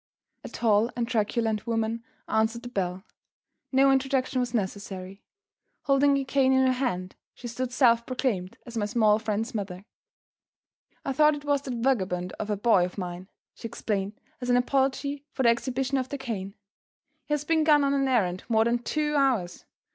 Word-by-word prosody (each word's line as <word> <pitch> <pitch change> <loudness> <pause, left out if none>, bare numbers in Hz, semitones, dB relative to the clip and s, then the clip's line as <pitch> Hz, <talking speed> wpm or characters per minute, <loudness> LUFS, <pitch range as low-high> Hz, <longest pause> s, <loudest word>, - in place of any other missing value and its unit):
A - - -7
tall 220 0 +2
and 235 -1 -1
truculent 225 -1 0
woman 225 0 -1 0.2
answered 220 +2 0
the 245 - -6
bell. 185 -4 -3 0.7
No 270 0 +5
introduction 265 -1 +1
was 245 -1 -1
necessary. 195 -3 -4 0.6
Holding 280 0 +4
a 275 - -1
cane 265 -1 +3
in 265 0 +4
her 260 - +3
hand, 190 -8 -2 0.2
she 240 - -8
stood 245 +2 -3
self 235 -2 +3
proclaimed 235 -8 -2
as 240 - -10
my 210 -2 0
small 215 -1 +3
friend's 220 +2 -2
mother. 195 -3 -5 1.2
"I 275 - -1
thought 300 +2 +4
it 290 0 -9
was 285 -1 +2
that 260 -3 -5
vagabond 185 -8 0
of 215 - -4
a 210 - 0
boy 205 -3 +4
of 180 +2 -4
mine," 180 0 -6 0.2
she - - -7
explained, 210 -2 -3 0.2
as 250 - -3
an 245 - +5
apology 275 +2 0
for 265 - -1
the 235 - +6
exhibition 260 +3 0
of 255 0 -4
the 285 - -4
cane. 210 -7 -5 0.7
"He 295 - +1
has 295 - -4
been 320 0 +2
gone 300 -2 +5
on 280 0 +2
an 275 -1 +1
errand 185 -8 +1
more 220 -1 +3
than 240 +1 +1
two 300 +4 -1
hours. 245 -11 +1
235 Hz, 180 wpm, -27 LUFS, 205-270 Hz, 1.2 s, the